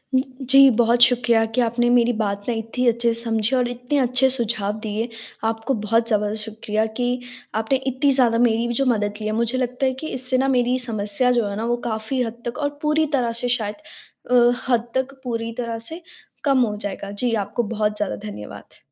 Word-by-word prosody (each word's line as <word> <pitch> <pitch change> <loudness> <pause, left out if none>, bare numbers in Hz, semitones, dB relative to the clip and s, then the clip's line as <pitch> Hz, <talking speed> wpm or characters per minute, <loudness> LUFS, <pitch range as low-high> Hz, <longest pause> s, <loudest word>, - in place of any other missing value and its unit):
जी, 265 +1 +4
बहुत 235 0 +2
शुक्रिया 240 -2 +4
कि 250 - +3
आपने 240 +1 +1
मेरी 245 0 +4
बात 200 -2 -1
ना 240 - +1
इतनी 225 +3 -2
अच्छे 235 0 +2
से 230 - -2
समझी 225 +1 0
और 250 -1 +2
इतने 245 +4 -2
अच्छे 255 +1 +3
सुझाव 220 -5 -1
दिए। 220 +2 -3 0.4
आपको 225 +3 -1
बहुत 230 +2 +2
ज़्यादा 210 -2 +1
शुक्रिया 215 0 -2
कि, 245 +3 -2 0.4
आपने 220 +4 +1
इतनी 265 +2 +2
ज़्यादा 245 -4 +3
मेरी 235 -1 +2
भी 240 - -2
जो 270 +3 +1
मदद 210 -5 +1
ली - - -4
है। - - -1
मुझे 235 +2 0
लगता 250 +1 -1
है 260 - +1
कि, 265 +5 -7
इससे 255 -2 -1
ना 265 +1 +1
मेरी 250 -1 +2
समस्या 225 0 0
जो 240 -3 +2
है 200 - -4
ना, 225 - -2
वो 240 +1 +1
काफ़ी 220 +4 -2
हद 235 0 -4
तक 240 +1 -4
और 290 -1 0
पूरी 305 +1 +2
तरह 240 -2 0
से - - +1
शायद 210 -3 -4 0.6
अ, - - +3 0.4
हद 240 -2 +2
तक, 260 +1 -1
पूरी 230 -2 -3
तरह 235 -2 -3
से 320 +10 -8 0.4
कम 275 -3 +3
हो 210 -2 -3
जाएगा। 200 -1 -5
जी, 230 +4 -1
आपको 225 +3 -1
बहुत 210 -1 -1
ज़्यादा 205 - -2
धन्यवाद। 105 0 -10
235 Hz, 205 wpm, -22 LUFS, 220-255 Hz, 0.6 s, जी